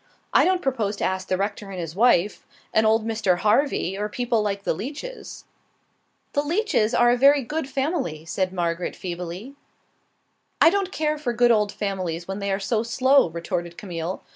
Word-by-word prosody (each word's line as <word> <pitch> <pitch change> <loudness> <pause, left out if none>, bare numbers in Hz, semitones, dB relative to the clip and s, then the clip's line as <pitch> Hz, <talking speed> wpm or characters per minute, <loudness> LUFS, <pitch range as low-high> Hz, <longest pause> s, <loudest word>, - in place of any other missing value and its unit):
I - - +6
don't 370 0 +1
propose 230 -6 -1
to - - -5
ask 190 0 -1
the 185 - 0
rector 200 +1 -3
and 190 -2 -6
his 165 -1 -5
wife, 210 -3 +3 0.3
and 220 0 +4
old 220 0 +3
Mr. 215 -5 +1
Harvey, 215 -2 +1
or 210 +1 -3
people 240 0 0
like 200 -1 -2
the - - 0
Leaches." 290 - -7 0.9
"The 285 - +2
Leaches 295 - +1
are 240 0 +5
a - - +4
very 280 +2 +5
good 300 +4 -3
old - - -13
family," 265 - -2
said 185 +2 -1
Margaret, 175 -1 -2
feebly. 180 +7 -6 1.1
"I 330 - +7
don't 390 -1 -1
care 305 -3 -1
for 250 -5 -2
good 240 +1 +4
old 210 -2 +2
families 185 -5 -3
when 195 +1 -4
they 200 0 -2
are 195 - 0
so 215 +3 0
slow," 260 0 +3
retorted 170 +1 -4
Camille. 175 -2 -5
210 Hz, 185 wpm, -24 LUFS, 185-265 Hz, 1.1 s, I